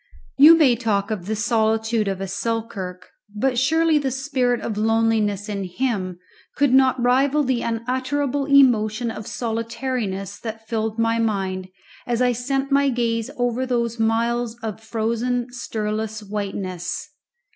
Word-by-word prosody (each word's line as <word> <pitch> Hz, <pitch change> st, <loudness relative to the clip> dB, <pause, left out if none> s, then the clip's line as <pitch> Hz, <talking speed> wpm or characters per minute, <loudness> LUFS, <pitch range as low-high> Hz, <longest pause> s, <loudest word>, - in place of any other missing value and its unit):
You 315 Hz, +4 st, +9 dB
may 275 Hz, -7 st, +5 dB
talk 215 Hz, -3 st, -1 dB
of 195 Hz, -4 st, -4 dB
the 220 Hz, -, -1 dB
solitude 220 Hz, 0 st, +1 dB
of 195 Hz, -1 st, -2 dB
a 195 Hz, -, -3 dB
Selkirk, 195 Hz, -4 st, -4 dB, 0.2 s
but 250 Hz, +3 st, +1 dB
surely 320 Hz, +3 st, +3 dB
the 275 Hz, -2 st, -1 dB
spirit 260 Hz, -2 st, 0 dB
of 220 Hz, -, -4 dB
loneliness 220 Hz, -2 st, +1 dB
in 200 Hz, -2 st, -3 dB
him 185 Hz, -2 st, -2 dB, 0.4 s
could 280 Hz, -2 st, +3 dB
not 265 Hz, -1 st, +4 dB
rival 270 Hz, +4 st, +3 dB
the 255 Hz, -3 st, 0 dB
unutterable 260 Hz, +4 st, -1 dB
emotion 240 Hz, -5 st, +4 dB
of 215 Hz, -1 st, -8 dB
solitariness 230 Hz, -4 st, -3 dB
that 225 Hz, -1 st, -7 dB
filled 220 Hz, 0 st, -2 dB
my 230 Hz, 0 st, +1 dB
mind 190 Hz, -4 st, -1 dB, 0.4 s
as 240 Hz, -1 st, 0 dB
I 250 Hz, -1 st, +3 dB
sent 270 Hz, +3 st, -2 dB
my 280 Hz, 0 st, +4 dB
gaze 230 Hz, -2 st, -1 dB
over 245 Hz, +1 st, 0 dB
those 235 Hz, -2 st, -1 dB
miles 230 Hz, +1 st, 0 dB
of 220 Hz, -1 st, -5 dB
frozen 235 Hz, +2 st, -2 dB
stirless 220 Hz, -2 st, -3 dB
whiteness. 195 Hz, -, -4 dB
230 Hz, 140 wpm, -22 LUFS, 215-255 Hz, 0.4 s, You